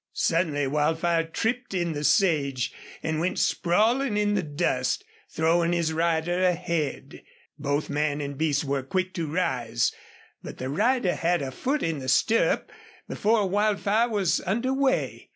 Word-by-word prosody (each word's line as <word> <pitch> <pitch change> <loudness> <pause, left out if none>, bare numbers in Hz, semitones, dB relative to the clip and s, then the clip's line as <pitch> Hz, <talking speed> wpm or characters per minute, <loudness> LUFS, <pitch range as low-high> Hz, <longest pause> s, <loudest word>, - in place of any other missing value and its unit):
Suddenly 160 -4 +1
Wildfire 160 +4 +1
tripped 225 +6 -2
in 175 -2 0
the 145 0 -4
sage, 140 - +2 0.3
and 160 -1 -1
went 175 +3 -1
sprawling 220 +7 +2
in 205 0 +1
the 200 - +1
dust, 145 -5 -1 0.2
throwing 170 +1 +2
his 165 -2 0
rider 170 +2 0
ahead. 170 -5 -1 0.4
Both 145 +1 -1
man 150 0 -1
and 140 -1 -4
beast 150 0 0
were 140 -1 -1
quick 185 +7 -2
to 160 -4 -3
rise, 120 -9 0 0.5
but - - -9
the 130 - -4
rider 200 - +1
had 170 -2 0
a 135 - -4
foot 275 - -2
in 165 -3 -1
the 130 -1 -4
stirrup 225 - +2 0.4
before 210 -1 +1
Wildfire 210 +3 +1
was 200 -6 +1
under 235 +8 0
way. 270 -1 0
170 Hz, 150 wpm, -26 LUFS, 145-200 Hz, 0.5 s, sage